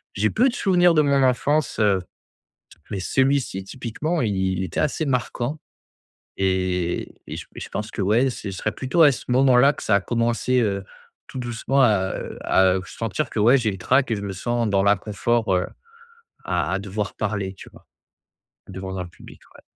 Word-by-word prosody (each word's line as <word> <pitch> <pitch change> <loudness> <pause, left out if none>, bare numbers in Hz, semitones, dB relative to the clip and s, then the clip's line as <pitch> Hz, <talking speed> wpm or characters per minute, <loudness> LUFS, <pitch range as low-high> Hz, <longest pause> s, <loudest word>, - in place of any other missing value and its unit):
j'ai 110 +2 +2
peu 245 - +3
de - - -5
souvenirs 180 -2 +4
de 155 - +5
mon 140 -1 +3
enfance, 140 +3 +1
heu, 100 -3 +3 0.9
mais 100 -3 -3
celui-ci, 130 -2 0
typiquement, 130 - -3
il 105 -4 0
il 95 0 0
était 85 - -3
assez 155 +1 0
marquant 125 +2 -2 0.8
et 95 -2 -1
et - - -6
je - - -8
et - - -7
je - - -7
pense 105 +1 -4
que, - - -6
ouais, 115 +7 +3
ce 105 -4 -6
serait 95 +3 -2
plutôt 130 - +1
à 150 - +8
ce - - -7
moment-là 130 +1 +5
que - - -9
ça 100 - +3
a - - +2
commencé, 120 +4 0
heu, 100 -4 -1 0.4
tout - - -7
doucement 125 +3 0
à, 100 -6 +2
heu - - -7
à, 95 -1 +3
heu, 95 - -3
sentir 110 -2 -3
que, 110 - -2
ouais, 120 +6 +6
j'ai 115 -4 0
le 95 - -7
trac 130 +8 +2
et - - +1
je 100 - -6
me 100 -1 -4
sens 120 +4 -1
dans 100 -1 +2
l'inconfort, 105 +2 +1
heu, 90 - +1 0.8
à - - -1
à 95 - 0
devoir 100 +1 -4
parler, 100 -2 -3
tu - - -13
vois? - - -19 0.8
Devant 95 0 -6
un 90 - -4
public, 85 - -15
ouais. - - -16
110 Hz, 195 wpm, -23 LUFS, 95-130 Hz, 0.9 s, à